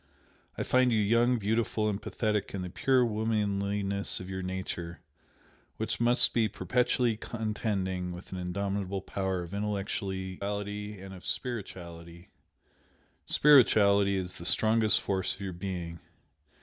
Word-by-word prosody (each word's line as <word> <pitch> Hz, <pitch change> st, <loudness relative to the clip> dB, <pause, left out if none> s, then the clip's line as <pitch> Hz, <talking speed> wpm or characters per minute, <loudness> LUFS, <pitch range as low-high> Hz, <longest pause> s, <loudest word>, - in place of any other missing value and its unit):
I -, -, -1 dB
find 130 Hz, -1 st, +3 dB
you 115 Hz, -, +3 dB
young, 115 Hz, +4 st, +3 dB
beautiful, 110 Hz, 0 st, 0 dB
and 105 Hz, -1 st, -1 dB
pathetic 105 Hz, -3 st, -1 dB
in 95 Hz, -, -3 dB
the 90 Hz, -, -6 dB
pure 130 Hz, +3 st, +3 dB
womanliness 100 Hz, -2 st, 0 dB
of 95 Hz, +1 st, -7 dB
your 95 Hz, 0 st, -3 dB
nature, 90 Hz, -3 st, -5 dB, 0.8 s
which -, -, -2 dB
must 120 Hz, +1 st, +3 dB
be 115 Hz, -2 st, +3 dB
perpetually 125 Hz, +1 st, +1 dB
contending 105 Hz, -5 st, -2 dB
with 90 Hz, +1 st, -10 dB
an 95 Hz, -, -4 dB
indomitable 95 Hz, +1 st, -2 dB
power 95 Hz, -2 st, -2 dB
of 85 Hz, -, -9 dB
intellectuality 100 Hz, 0 st, -3 dB
and 95 Hz, 0 st, -9 dB
of 90 Hz, -, -11 dB
spirituality, 85 Hz, -7 st, -6 dB, 1.0 s
spirituality 100 Hz, -8 st, +5 dB
is 90 Hz, -1 st, -4 dB
the -, -, -7 dB
strongest 110 Hz, +2 st, +4 dB
force 95 Hz, -2 st, -1 dB
of -, -, -14 dB
your 95 Hz, -2 st, -4 dB
being. 85 Hz, -2 st, -5 dB
100 Hz, 130 wpm, -30 LUFS, 95-110 Hz, 1.0 s, spirituality